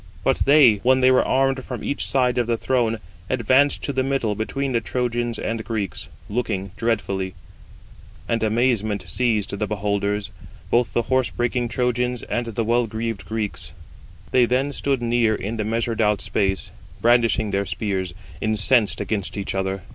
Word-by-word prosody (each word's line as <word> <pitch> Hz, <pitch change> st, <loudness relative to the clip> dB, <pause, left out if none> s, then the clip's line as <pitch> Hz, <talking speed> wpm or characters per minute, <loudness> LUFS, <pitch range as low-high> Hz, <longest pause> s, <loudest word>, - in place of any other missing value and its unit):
But -, -, +2 dB
they, 140 Hz, -7 st, +7 dB
when 130 Hz, +6 st, +3 dB
they 130 Hz, 0 st, +6 dB
were 130 Hz, -, +5 dB
armed 135 Hz, 0 st, +1 dB
from 125 Hz, -4 st, -6 dB
each 140 Hz, -, -1 dB
side 125 Hz, -2 st, +2 dB
of 120 Hz, -, 0 dB
the 115 Hz, -1 st, +1 dB
throng, 115 Hz, -3 st, +1 dB, 0.3 s
advanced 130 Hz, +3 st, +3 dB
to 140 Hz, -, -2 dB
the 130 Hz, -, +1 dB
middle 130 Hz, -5 st, 0 dB
between 130 Hz, +6 st, -2 dB
the 115 Hz, -2 st, +1 dB
Trojans 120 Hz, -1 st, -2 dB
and 110 Hz, +1 st, -3 dB
Greeks, 110 Hz, -4 st, -4 dB, 0.2 s
looking 105 Hz, -4 st, -2 dB
dreadfully; 95 Hz, -5 st, -1 dB, 0.9 s
and 115 Hz, -1 st, 0 dB
amazement 110 Hz, -3 st, +1 dB
seized 110 Hz, +1 st, 0 dB
the 105 Hz, -, 0 dB
beholders, 100 Hz, 0 st, -1 dB, 0.4 s
both 120 Hz, 0 st, +2 dB
the 120 Hz, -, +1 dB
horse 130 Hz, +1 st, +1 dB
breaking 120 Hz, 0 st, -1 dB
Trojans 125 Hz, 0 st, -1 dB
and 120 Hz, 0 st, -2 dB
the 115 Hz, 0 st, -2 dB
well 120 Hz, +1 st, +2 dB
greaved 110 Hz, -1 st, -4 dB
Greeks. 105 Hz, -8 st, -4 dB, 0.6 s
They 125 Hz, -1 st, +5 dB
then 135 Hz, +4 st, 0 dB
stood 135 Hz, -4 st, -1 dB
near 115 Hz, -2 st, +2 dB
in 105 Hz, +3 st, -4 dB
the 110 Hz, -, -1 dB
measured 115 Hz, +1 st, -1 dB
out 105 Hz, -2 st, +2 dB
space, 95 Hz, -1 st, -1 dB, 0.3 s
brandishing 115 Hz, -1 st, +3 dB
their 100 Hz, 0 st, 0 dB
spears, 95 Hz, -1 st, -2 dB, 0.3 s
incensed 110 Hz, +1 st, +2 dB
against 105 Hz, -3 st, -2 dB
each 100 Hz, -, -3 dB
other. 95 Hz, 0 st, -2 dB
115 Hz, 160 wpm, -23 LUFS, 105-125 Hz, 0.9 s, they